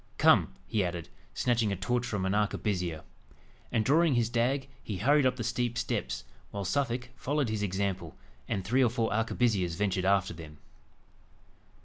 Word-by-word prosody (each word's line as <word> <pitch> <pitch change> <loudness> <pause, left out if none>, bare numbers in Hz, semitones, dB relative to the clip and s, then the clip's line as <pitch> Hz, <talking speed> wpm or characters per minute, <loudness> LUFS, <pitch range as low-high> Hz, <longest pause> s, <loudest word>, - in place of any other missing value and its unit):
Come," 60 - +5
he 105 -3 0
added, 85 -2 -4 0.3
snatching 115 -4 +1
a - - 0
torch 120 +6 -1
from 100 -3 -2
an 95 - +1
arquebusier. 95 -6 -1 0.7
And, 110 -2 +1
drawing 155 0 +4
his 120 -1 +2
dag, 130 +3 +1
he 105 - -5
hurried 140 +7 +4
up 130 - 0
the 120 - -4
steep 120 +1 -1
steps, 65 - -2 0.3
while 100 -1 -4
Suffolk 125 +3 -1
followed 145 -1 -1
his 110 -1 -2
example, 100 -1 -2 0.3
and 95 - -2
three 130 +5 +3
or 120 - +4
four 115 -3 0
arquebusiers 110 -5 +1
ventured 95 -1 0
after 95 -2 +2
them. 80 -2 -10
110 Hz, 160 wpm, -30 LUFS, 95-125 Hz, 0.7 s, Come